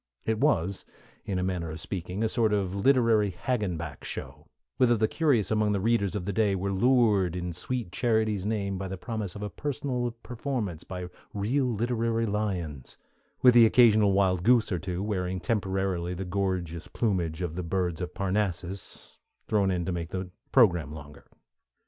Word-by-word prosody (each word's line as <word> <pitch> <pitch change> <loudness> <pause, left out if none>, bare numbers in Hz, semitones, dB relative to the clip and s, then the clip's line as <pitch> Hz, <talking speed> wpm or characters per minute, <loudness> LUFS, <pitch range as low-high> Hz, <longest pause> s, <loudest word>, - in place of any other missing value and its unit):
It 110 -1 0
was, 100 - +1 0.4
in 95 - -2
a 90 - 0
manner 90 -3 -2
of 80 +2 -6
speaking, 95 +3 -4
a - - +3
sort 110 -1 +1
of 95 -3 0
Literary 115 -1 +3
Hagenbeck 90 - -3
Show, - - -7 0.3
whither 120 -2 +4
the 110 +1 +2
curious 125 - +1
among 105 -1 +2
the 100 - 0
readers 105 -1 +1
of 95 -4 -3
the 100 - -2
day 100 -1 +2
were 100 +1 -2
lured 105 -5 +3
in 90 -1 -3
sweet 110 +3 -4
Charity's 110 -4 +1
name 100 -2 -2
by 95 - -3
the 95 +1 -5
promise 105 -2 -4
of 105 - -6
a 105 - -3
personal 135 -3 -2
performance 115 - -3
by 90 -1 -6 0.3
real 120 +7 +1
literary 115 0 0
lions, 95 - -3 0.5
with 125 -1 +7
an 120 - +9
occasional 110 -3 +5
wild 95 -2 +2
goose 115 +1 +4
or 90 - 0
two 90 0 -3
wearing 95 -3 -2
temporarily 95 -2 -1
the 95 +2 -4
gorgeous 90 -3 -2
plumage 90 -8 -1
of 85 -3 -3
the 90 - -3
Birds 90 -1 -1
of 90 0 -5
Parnassus, 95 -1 -3 0.3
thrown 100 -3 +2
in 90 -2 -1
to 95 - -1
make 85 -1 -3
the 95 -1 -5 0.2
program 85 - +4
longer. 75 -2 -11
100 Hz, 175 wpm, -28 LUFS, 90-110 Hz, 0.5 s, an